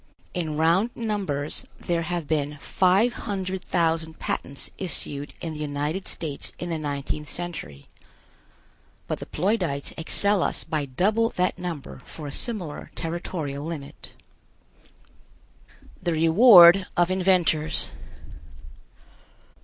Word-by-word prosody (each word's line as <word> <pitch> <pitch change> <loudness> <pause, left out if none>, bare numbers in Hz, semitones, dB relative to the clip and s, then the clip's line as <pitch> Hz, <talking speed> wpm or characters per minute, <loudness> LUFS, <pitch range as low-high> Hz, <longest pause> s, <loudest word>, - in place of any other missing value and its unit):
In 160 -4 -2
round 170 +8 +3
numbers, 195 -11 -2 0.2
there 170 -1 -1
have 170 -1 -3
been 150 -2 -1
five 190 +8 +3
hundred 190 -4 -4
thousand 165 -2 0
patents 140 +1 -3
issued 145 -6 -4
in 165 -2 -4
the 150 - -7
United 150 +5 -2
States 150 -4 -4
in 175 -1 -5
the 165 - -1
nineteenth 145 0 -3
century, 170 - -6 1.2
but - - -3
the - - -7
Ploidites 175 -6 -1
excel 200 +4 +2
us - - 0
by 155 -2 -2
double 210 - +1
that 180 0 0
number 170 -6 -5
for 155 - -9
a 145 - -5
similar 180 - -4
territorial 160 -4 -4
limit. 155 -3 -7 1.9
THE 175 -2 0
REWARD 175 +2 +8
OF 175 +1 +3
INVENTORS. 180 -4 +2
170 Hz, 115 wpm, -25 LUFS, 150-185 Hz, 1.9 s, REWARD